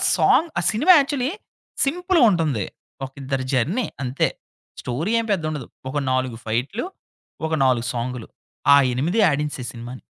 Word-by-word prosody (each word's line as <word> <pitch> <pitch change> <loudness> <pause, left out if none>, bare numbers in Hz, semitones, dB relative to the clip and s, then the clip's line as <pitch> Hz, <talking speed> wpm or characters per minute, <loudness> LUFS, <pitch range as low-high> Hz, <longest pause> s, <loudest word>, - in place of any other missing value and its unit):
Song 330 - +4
ఆ - - 0
cinema 295 +12 +5
actually, 275 0 0 0.5
సింపుల్‍గా 355 +2 +2
ఉంటుంది. 150 - 0 0.4
ఒకిద్దరు 135 0 -4
జర్నీ 160 - +1 0.2
అంతే. 130 +1 +1 0.5
స్టోరీ 145 - -2
ఏం 230 - -2
పెద్ద 180 -5 0
ఉండదు. 150 -6 -5 0.2
ఒక 145 - -3
4 130 -2 0
ఫైట్లు. 125 - -2 0.6
ఒక 160 - -2
4 125 -2 +2
సాంగులు. 120 0 -4 0.5
ఆ - - +9 0.2
8 165 - 0
ఆడించేశాయి 145 -4 -2
సినిమాని. 120 +2 -8
140 Hz, 135 wpm, -22 LUFS, -, 0.6 s, ఆ